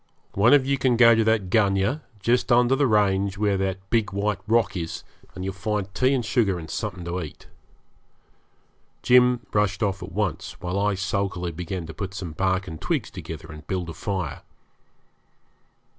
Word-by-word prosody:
One 115 +8 +5
of 135 -2 +3
you 140 0 0
can 125 -3 +2
go 115 -1 +8
to 115 0 +3
that 110 -5 +1
gunyah, 100 +6 +2 0.2
just 125 +5 +1
under 120 +2 +5
the 140 0 +2
range 100 -3 +2
where 100 -1 +1
that 95 0 -3
big 110 -3 +1
white 100 0 -1
rock 110 -3 +2
is, 85 -2 -4 0.3
and 95 - -5
you'll 95 - -3
find 100 -1 -3
tea 130 +5 +2
and 120 -3 -1
sugar 105 -5 +1
and 80 -2 -8
something 90 -2 -4
to 90 +1 -3
eat.' 80 - -9 1.6
Jim 125 0 +4
rushed 105 -2 +1
off 100 -2 -1
at 90 +2 -7
once, 100 -1 -3
while 90 +2 -2
I 105 0 +1
sulkily 95 -2 -2
began 90 +1 -5
to 80 - -8
put 95 +4 -6
some 90 -4 -5
bark 95 +3 0
and 80 -3 -8
twigs - - -1
together 80 0 -8
and 75 -1 -12
build 90 -3 -3
a - - -8
fire. 95 -2 -4
100 Hz, 180 wpm, -24 LUFS, 90-110 Hz, 1.6 s, go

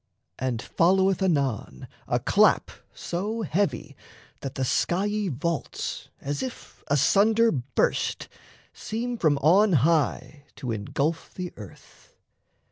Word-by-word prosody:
And 125 -2 -2
followeth 190 +2 +2
anon 140 - -1 0.2
A - - +1
clap - - +3 0.2
so 210 +6 -3
heavy 170 -5 -1 0.4
that 135 -1 -6
the 135 - -1
skiey 200 - 0
vaults, 160 +3 -3
As 140 +1 -3
if 260 -2 -8
asunder 205 - +4
burst, 130 -2 -1 0.5
seem 240 +3 -4
from 155 -5 +3
on 190 +6 +5
high 145 -3 0
To 125 -4 -5
engulf 140 +9 -2
the 180 -1 -5
earth. 105 -4 -14
165 Hz, 110 wpm, -26 LUFS, 140-195 Hz, 0.5 s, on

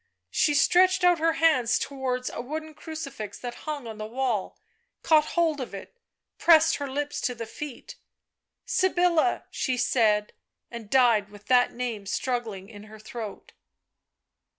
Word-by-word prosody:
She 295 -1 +2
stretched 370 +5 +4
out 355 -2 +5
her 325 +1 +2
hands 275 -8 +3
towards 255 -2 -3
a - - -5
wooden 310 +5 -6
crucifix 295 - -7
that 245 -1 -6 0.2
hung 290 -4 -4
on 220 -2 -8
the 215 - -4
wall, 240 -4 -2 0.5
caught 310 -2 +4
hold 320 -4 +2
of 240 - -6
it, 195 - -10 0.4
pressed 325 -2 +5
her 285 -1 -4
lips 290 +2 -3
to 250 - -1
the 230 0 -6
feet.... 265 +3 -9 0.4
" - - -61
Sybilla," 360 -2 +2
she 255 -1 -1
said, 220 -4 +2 0.4
and 230 -3 -8
died 235 -6 +4
with 205 0 -15
that 250 -1 +4
name 235 -5 -4
struggling 225 -5 -3
in 210 -1 -12
her 215 0 -13
throat. 215 -1 -8
255 Hz, 150 wpm, -26 LUFS, 220-310 Hz, 0.5 s, out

